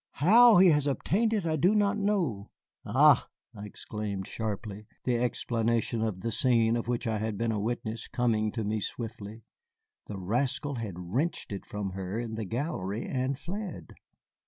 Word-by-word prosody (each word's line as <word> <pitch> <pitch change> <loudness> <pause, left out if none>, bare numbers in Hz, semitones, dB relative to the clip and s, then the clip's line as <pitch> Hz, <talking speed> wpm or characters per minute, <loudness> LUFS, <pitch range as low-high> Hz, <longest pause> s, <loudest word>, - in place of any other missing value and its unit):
How 225 - +7
he 185 0 +7
has 150 -2 +3
obtained 205 - +1
it 210 -5 0
I 160 -1 0
know 200 +6 +3
not." 165 - 0 0.4
"Ah!" - - +5 0.3
I 105 0 -7
exclaimed 105 -2 -5
sharply, 105 -1 -5 0.2
the 120 -2 +1
explanation 115 -1 0
of 110 -5 -2
the 115 - -2
scene 115 -1 +3
of 120 0 -3
which 120 -1 -1
I 110 -2 -1
had 110 -1 -2
been 115 +1 0
a 105 - -1
witness 110 0 -3
coming 110 -3 0
to 115 - -2
me 105 +1 -1
swiftly. 110 0 -6 0.6
The 105 - -6
rascal 125 +8 -1
had 110 -6 -5
wrenched 110 - -2
it 100 - -6
from 100 -2 -4
her 95 +2 -4
in 115 -1 -4
the 110 -1 -3
gallery 115 - -3
and 130 +1 -1
fled. 190 +5 -6
115 Hz, 165 wpm, -29 LUFS, 105-140 Hz, 0.6 s, How